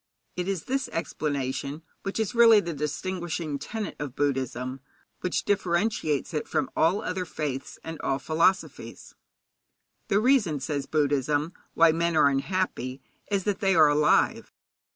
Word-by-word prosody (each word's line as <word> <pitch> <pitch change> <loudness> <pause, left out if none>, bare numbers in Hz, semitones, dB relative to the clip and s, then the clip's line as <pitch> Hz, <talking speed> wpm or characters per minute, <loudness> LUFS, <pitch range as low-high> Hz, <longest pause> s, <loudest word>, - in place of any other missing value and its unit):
It 180 0 -3
is 195 -5 -2
this 270 +1 -2
explanation 140 -2 -3 0.2
which 195 +2 -4
is 220 +1 -1
really 230 -2 +7
the 170 -4 -3
distinguishing 160 0 -3
tenet 220 +4 -5
of 140 -3 -5
Buddhism, 130 -2 -2 0.4
which 180 - -1
differentiates 175 -6 0
it 150 - -2
from - - -1
all 180 +6 +2
other 185 0 -2
faiths 150 -6 -5
and 160 -1 -7
all 135 - 0
philosophies. 165 +7 -1 0.9
The 200 - +3
reason, 215 - +3
says 140 +1 -3
Buddhism, 145 +1 +1 0.2
why 165 0 +6
men 165 0 0
are 145 - +6
unhappy 135 -3 -2 0.3
is 200 -2 0
that 205 -1 -1
they 195 -2 +2
are 155 -2 +7
alive. 150 +1 +2
160 Hz, 140 wpm, -27 LUFS, 145-190 Hz, 0.9 s, really